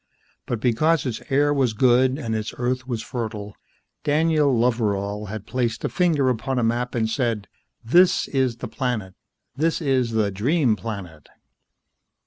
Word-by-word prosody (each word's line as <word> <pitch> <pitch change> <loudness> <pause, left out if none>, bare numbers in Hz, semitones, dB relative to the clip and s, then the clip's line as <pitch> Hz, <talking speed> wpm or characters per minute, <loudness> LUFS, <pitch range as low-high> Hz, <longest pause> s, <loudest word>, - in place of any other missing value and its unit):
But 120 - -2
because 135 +7 +2
its 120 -4 -3
air 145 +2 +3
was 130 -5 +1
good 130 +3 +3
and 115 -7 -3
its 110 0 -4
earth 125 +1 -2
was 115 -3 -3
fertile, 110 -5 -5 0.5
Daniel 155 -1 +2
Loveral 105 -4 0
had 105 0 -6
placed 120 -1 -2
a - - 0
finger 165 -7 +2
upon 130 +2 -1
a 120 - +1
map 120 +2 -1
and 110 -2 +1
said, 115 -3 -1 0.4
"This 175 +9 +4
is 130 -4 +1
the 120 - -6
planet. 110 -4 -3 0.4
This 160 +4 +1
is 130 -6 0
the 105 -2 +1
Dream 125 - +2
Planet." 95 -9 -7
120 Hz, 150 wpm, -23 LUFS, 110-135 Hz, 0.5 s, This